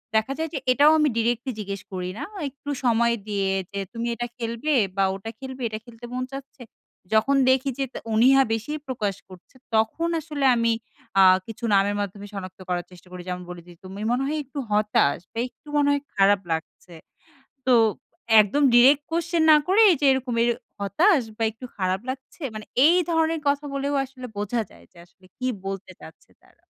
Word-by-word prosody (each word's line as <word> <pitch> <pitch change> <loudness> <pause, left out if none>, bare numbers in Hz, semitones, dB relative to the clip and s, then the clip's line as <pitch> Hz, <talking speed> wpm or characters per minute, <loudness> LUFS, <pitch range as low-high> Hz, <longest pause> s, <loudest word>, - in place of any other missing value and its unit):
দেখা 220 +5 +2
যায় 320 0 -2
যে 280 - -2
এটাও 290 +4 +6
আমি 300 -1 +3
ডিরেক্টলি 240 +3 0
জিজ্ঞেস 200 -2 -5
করি 180 -1 -3
না। - - -4 0.3
একটু 280 +2 -11
সময় 235 -1 +3
দিয়ে 200 -2 -1 0.2
যে, 200 - -4
"তুমি 235 0 -3
এটা 240 +1 -3
খেলবে? 235 +6 -2 0.2
বা 195 - +3
ওটা 195 +3 -7
খেলবে? 260 -1 -8
এটা 215 -1 -5
খেলতে 240 0 -12
মন 255 0 -2
চাচ্ছে?" 275 -1 -9 0.5
যখন 225 +6 +3
দেখি 265 +1 +2
যে - - +1
তা - - -5
অনিহা 265 +5 +6
বেশি 225 +6 -3 0.2
প্রকাশ 215 -7 -2
করছে, 185 +6 -16 0.2
তখন 225 +10 +1
আসলে 300 -3 -3
আমি 230 -1 +2 0.5
আ - - +8 0.3
কিছু 225 +1 -10
নামের 200 +1 +2
মাধ্যমে 200 0 -6
সনাক্ত 185 -2 -7
করার 175 -1 -1
চেষ্টা 180 0 -16
করি। 180 - -7
যেমন, 180 0 -4
বলেদি 175 0 -10
"তুমি 195 +2 -8
মনে 250 +2 +1
হয় 305 +2 -1
একটু 280 +2 -7
হতাশ?" 210 -9 +2
বা - - -10
"একটু 305 - -30
মনে 290 -1 +3
হয় 285 0 0
খারাপ 195 0 +4
লাগছে?" 160 +2 -5 0.7
তো 255 - +4 0.7
একদম 215 +8 +1
ডিইরেক্ট 270 +4 +6
কোয়েশ্চেন 335 0 0
না 305 - +9
করে, 385 +4 +4
এইযে 290 -3 +1
এরকম 260 -2 -2
এ, - - +3 0.3
"হতাশ?" 305 - +3
বা - - -4
"একটু 225 +3 -13
খারাপ 185 -1 -1
লাগছে?" 265 +5 -9
মানে 215 - -7 0.2
এই 345 - +5
ধরনের 325 -1 +1
কথা 285 +1 +1
বলেও 280 +1 -1
আসলে 255 -1 -10
বোঝা 210 +3 -1
যায়, - - -18
যে 175 - -19
আসলে 185 +1 -24
কি 255 - -3 0.2
বলতে 195 -1 -5
চাচ্ছে 160 - -15
তারা। - - -27
235 Hz, 185 wpm, -24 LUFS, 200-275 Hz, 0.7 s, না